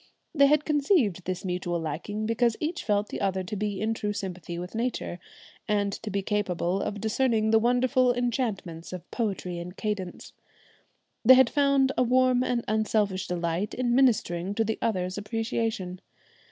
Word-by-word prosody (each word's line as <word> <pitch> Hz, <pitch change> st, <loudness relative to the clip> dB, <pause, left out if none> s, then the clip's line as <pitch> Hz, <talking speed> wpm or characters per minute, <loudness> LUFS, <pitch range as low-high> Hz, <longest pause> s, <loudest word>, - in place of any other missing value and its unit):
They 280 Hz, -3 st, +6 dB
had 300 Hz, +1 st, +3 dB
conceived 280 Hz, -, +2 dB
this 185 Hz, +2 st, -3 dB
mutual 180 Hz, -1 st, -2 dB
liking 170 Hz, +7 st, -4 dB
because 230 Hz, +1 st, +1 dB
each 325 Hz, +3 st, -3 dB
felt 205 Hz, -1 st, 0 dB
the -, -, -5 dB
other 190 Hz, -1 st, 0 dB
to 190 Hz, +3 st, -5 dB
be 205 Hz, -1 st, -2 dB
in 220 Hz, +2 st, 0 dB
true 210 Hz, -2 st, -2 dB
sympathy 180 Hz, -4 st, -5 dB
with 180 Hz, +1 st, -6 dB
nature, 230 Hz, -6 st, -3 dB, 0.5 s
and 205 Hz, -2 st, +1 dB
to 220 Hz, -, -6 dB
be 200 Hz, -1 st, -2 dB
capable 195 Hz, -3 st, -1 dB
of 205 Hz, -, -3 dB
discerning 220 Hz, 0 st, +1 dB
the 225 Hz, -, +6 dB
wonderful 250 Hz, +2 st, +3 dB
enchantments 225 Hz, -9 st, -2 dB
of 180 Hz, -, -8 dB
poetry 190 Hz, -6 st, -2 dB
and 180 Hz, +2 st, -8 dB
cadence. 205 Hz, -4 st, -4 dB, 0.9 s
They 260 Hz, +3 st, +9 dB
had 260 Hz, -2 st, +5 dB
found 275 Hz, -2 st, +3 dB
a -, -, +4 dB
warm 255 Hz, 0 st, +3 dB
and 245 Hz, -2 st, -1 dB
unselfish 210 Hz, -3 st, 0 dB
delight 175 Hz, +2 st, -2 dB
in 245 Hz, -1 st, 0 dB
ministering 205 Hz, -8 st, +2 dB
to 225 Hz, -, +2 dB
the 220 Hz, 0 st, -2 dB
other's 185 Hz, -3 st, -1 dB
appreciation. 220 Hz, -4 st, -3 dB
210 Hz, 165 wpm, -27 LUFS, 185-245 Hz, 0.9 s, They